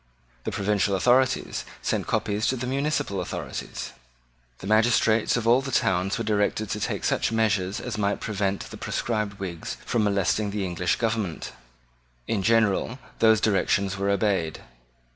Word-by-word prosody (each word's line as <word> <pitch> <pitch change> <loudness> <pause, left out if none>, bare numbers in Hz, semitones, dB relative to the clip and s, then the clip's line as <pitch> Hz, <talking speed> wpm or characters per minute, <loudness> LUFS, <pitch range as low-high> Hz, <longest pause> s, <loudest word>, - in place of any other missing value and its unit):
The - - -1
provincial 100 0 +1
authorities 125 +6 +2 0.2
sent - - -1
copies 105 +1 0
to 130 - +1
the 125 0 -4
municipal 135 -7 -1
authorities. 90 - -5 0.7
The - - -10
magistrates 110 +1 +3
of 115 -2 -2
all 120 +3 +5
the 135 - -5
towns 95 -3 +1
were 115 - -2
directed 105 0 0
to 105 - -2
take - - -2
such - - +1
measures 105 -3 +1
as 115 -4 -5
might 100 0 0
prevent 100 -2 -1
the - - -8
proscribed 105 -3 -2
Whigs 90 -4 -5
from 115 - +1
molesting 100 +1 +1
the 100 -1 -2
English 90 -1 0
government. 110 - -2 0.8
In 105 - 0
general 115 +2 +2 0.2
those 110 -1 +5
directions 100 -2 +1
were 100 0 -1
obeyed. 100 -5 0
105 Hz, 150 wpm, -25 LUFS, 100-115 Hz, 0.8 s, all